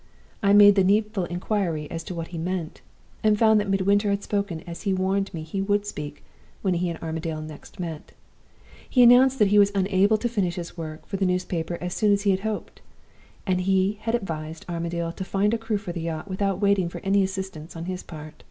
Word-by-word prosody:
I 200 -2 +3
made 205 0 +8
the 195 -1 +3
needful 210 0 +2
inquiry 175 -3 -2
as 165 0 -4
to 180 - -6
what 165 -1 -5
he 170 - -6
meant, 170 -1 -4 0.4
and 215 -1 +4
found 220 -1 +5
that 205 -1 -2
Midwinter 200 +2 +2
had 200 0 0
spoken 200 -6 -2
as 170 -1 -8
he 205 - -2
had 190 - +1
warned 195 +1 0
me 160 -2 -6
he 195 +5 -3
would 205 +1 +1
speak 150 -7 -7 0.4
when 190 -2 +2
he 175 0 0
and 165 - -4
Armadale 160 -1 -3
next 155 +2 -11
met. 165 -4 -6 0.8
He 250 - +4
had 240 0 +9
announced 260 +2 +5
that 210 -4 +4
he 205 +1 +5
was 200 0 +5
unable 195 +2 +3
to 240 - -1
finish 195 -7 -1
his 175 -1 -6
work 155 -2 -7
for 195 - -4
the 190 - +1
newspaper 175 -2 -2
as 180 0 -3
soon 210 -1 +2
as 200 0 +2
he 200 - +4
had 190 - +1
hoped; 215 +1 -5 0.6
and 185 -2 +1
he 190 +2 +1
had 225 +1 0
advised 160 -7 -5
Armadale 170 -1 -3
to 180 - -6
find 200 +3 +1
a - - +2
crew 225 -2 -1
for 200 -3 -6
the 170 -1 -5
yacht 160 +2 -4
without 195 -1 -1
waiting 200 -3 +2
for - - -8
any 200 0 +2
assistance 190 -4 -4
on 165 0 -5
his 185 0 -4
part. 155 -2 -10
190 Hz, 225 wpm, -25 LUFS, 170-205 Hz, 0.8 s, had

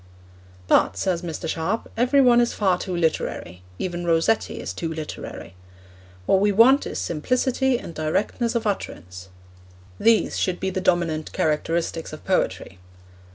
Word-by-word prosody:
But, - - +3
says 180 -3 0
Mr. 165 -1 -5
Sharp, 165 +8 -2
every 255 +4 +3
one 240 -2 +6
is 240 - 0
far 190 -4 +1
too 185 -3 -4
literary; 155 - -2 0.2
even 175 - -3
Rossetti 170 +6 +1
is - - -5
too 165 -1 -4
literary. 155 - -7 0.7
What 190 - +4
we 205 0 +3
want 240 +7 +5
is - - -5
simplicity 255 - 0
and 170 - -9
directness 200 +9 -1
of 235 -1 -1
utterance; 90 - -5 0.7
these 230 -1 +3
should 185 -2 -1
be 190 - -2
the 185 - -2
dominant 170 -4 0
characteristics 165 +1 -1
of 155 - -10
poetry. 95 - -1
180 Hz, 145 wpm, -23 LUFS, 160-225 Hz, 0.7 s, one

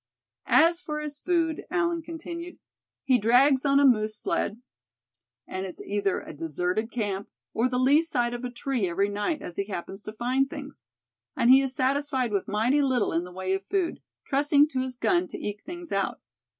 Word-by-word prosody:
"As 335 +2 +5
for 300 -4 -4
his 300 -1 -6
food," 330 -2 0
Allan 340 -2 0
continued, 335 +2 -7 0.5
"he 255 -2 +3
drags 255 +5 +4
on 280 0 +4
a 285 - +5
moose 215 -4 +3
sled, 215 +1 -1 0.9
and 185 - -5
it's 180 - -10
either 200 -1 -1
a - - -9
deserted 180 +8 -2
camp, 205 -5 -3 0.2
or 240 +3 +1
the 250 - -1
lee 270 +5 +5
side 245 -7 -1
of 240 +1 -5
a 250 - -2
tree 245 -5 -2
every 195 +4 +1
night, 210 +10 -2
as 175 - -8
he 200 - -1
happens 195 0 -6
to 215 - -8
find 255 +4 0
things. 285 -1 -9 0.6
And 240 - +5
he 265 +1 +8
is 270 -1 -2
satisfied 265 -2 0
with 200 -2 -1
mighty 235 +8 +2
little 260 -5 +1
in 165 +2 0
the 180 - -10
way 190 +1 -2
of 195 0 -3
food, 375 -4 -1 0.2
trusting 290 +1 +3
to 265 - -2
his 255 0 -3
gun 350 +7 +1
to - - -7
eke 205 0 -5
things 345 0 -8
out. 195 -1 -1
255 Hz, 190 wpm, -27 LUFS, 205-295 Hz, 0.9 s, he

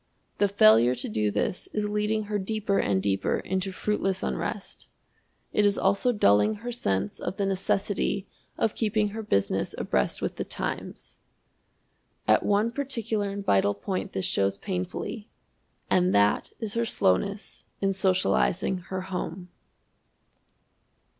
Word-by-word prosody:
The 205 - +4
failure 120 - +5
to 125 - -2
do 105 0 0
this 180 - -2
is 210 -1 0
leading 210 +1 0
her 210 0 -2
deeper 200 0 0
and 95 -1 +1
deeper 95 -1 +1
into 190 0 -2
fruitless 195 0 -1
unrest. - - -4 0.7
It 210 - +3
is 205 -1 +3
also 195 +6 +2
dulling 205 - +4
her 235 +4 -6
sense 100 - -1
of 190 - -4
the 200 - 0
necessity 195 +1 0 0.3
of 220 - +1
keeping 215 -1 +1
her 220 +2 -5
business 100 - 0
abreast 65 - 0
with - - -3
the - - -1
times. - - -5 1.1
At - - +5
one 210 +3 +2
particular 230 -6 -2
and 200 0 -5
vital 100 +1 +3
point 185 - -4
this 95 - -1
shows 100 0 +1
painfully, 185 - -4 0.6
and 180 0 +3
that 100 0 +3
is 220 -3 -3
her 235 - +1
slowness 200 - 0 0.2
in 195 0 +1
socializing 185 -1 +1
her 185 +1 -5
home. 180 -1 -5
195 Hz, 140 wpm, -27 LUFS, -, 1.1 s, failure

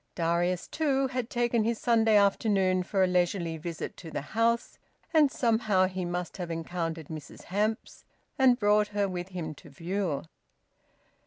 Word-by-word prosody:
Darius 175 +1 0
too 275 -4 +1
had 255 -2 -3
taken 240 -2 +1
his 230 +1 0
Saturday 225 -2 +3
afternoon 195 -2 +3
for 190 +1 +1
a - - +4
leisurely 175 -2 0
visit 165 0 -6
to 165 - -9
the 150 - -4
house, 230 +1 +1 0.3
and 305 -3 +6
somehow 220 -6 +2
he 185 -1 -3
must 175 0 -4
have 175 -3 -5
encountered 165 -1 -4
Mrs 155 -2 -9
Hamps, 215 +4 -2 0.3
and 260 -2 +5
brought 210 -2 +3
her 200 -1 +2
with 180 -1 -4
him 175 -5 -5
to 150 - -15
view. 170 +1 -2
190 Hz, 155 wpm, -28 LUFS, 175-225 Hz, 0.3 s, and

